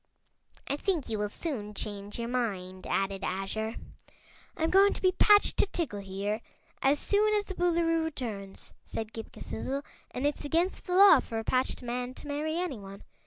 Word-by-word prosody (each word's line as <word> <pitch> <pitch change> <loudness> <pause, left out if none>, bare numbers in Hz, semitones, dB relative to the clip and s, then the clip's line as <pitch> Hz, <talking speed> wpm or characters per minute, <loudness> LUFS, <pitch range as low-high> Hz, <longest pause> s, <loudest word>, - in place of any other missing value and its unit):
"I 280 - -1
think 340 -4 -1
you 215 -2 -1
will 210 0 -1
soon 210 -6 -4
change 205 0 -4
your 235 0 -3
mind," 195 -7 -2
added 195 0 -1
Azure. 205 +4 -2 0.8
"I'm 320 0 +1
going 395 +2 +6
to - - -6
be 370 - +5
patched 410 +2 +5
to - - +4
Tiggle, 295 - -3
here, 200 +3 -3 0.4
as 275 +2 +4
soon 425 +6 +2
as 410 -1 +1
the 385 - -6
Boolooroo 335 -2 +2
returns," 225 -11 -6
said 220 0 -5
Ghip 225 -1 -7
Ghisizzle, 275 +5 -4 0.3
"and 255 - -3
it's 290 +1 0
against 335 +5 0
the 360 - 0
law 395 +1 +9
for 225 - -5
a 225 - -2
patched 255 +2 0
man 245 +1 -3
to - - -10
marry 305 +3 -2
anyone. 210 - -5
255 Hz, 175 wpm, -30 LUFS, 210-330 Hz, 0.8 s, law